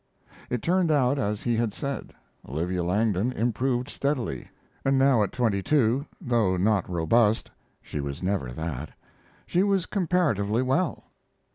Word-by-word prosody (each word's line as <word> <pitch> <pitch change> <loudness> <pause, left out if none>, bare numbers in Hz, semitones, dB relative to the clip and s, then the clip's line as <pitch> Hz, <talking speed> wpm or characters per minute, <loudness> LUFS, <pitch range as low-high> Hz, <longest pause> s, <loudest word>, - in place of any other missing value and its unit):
It 125 - -2
turned 180 0 +2
out 140 -2 +3
as 105 -4 -2
he 120 -1 +1
had 115 -3 -1
said. 140 -1 -4 0.4
Olivia 85 +6 -1
Langdon 105 +4 +1
improved 125 +2 0
steadily, 130 - -2 0.3
and 135 0 +2
now 135 -4 +4
at 105 - 0
twenty 110 -6 0
two, 140 +1 +2
though 115 - +1
not 100 0 +1
robust 105 +6 +2 0.3
she - - -5
was 70 +4 -5
never 90 -10 -1
that 80 0 -5 0.5
she 180 - +1
was 195 -3 +2
comparatively 145 - +1
well. 135 +5 0
115 Hz, 140 wpm, -26 LUFS, 95-140 Hz, 0.5 s, now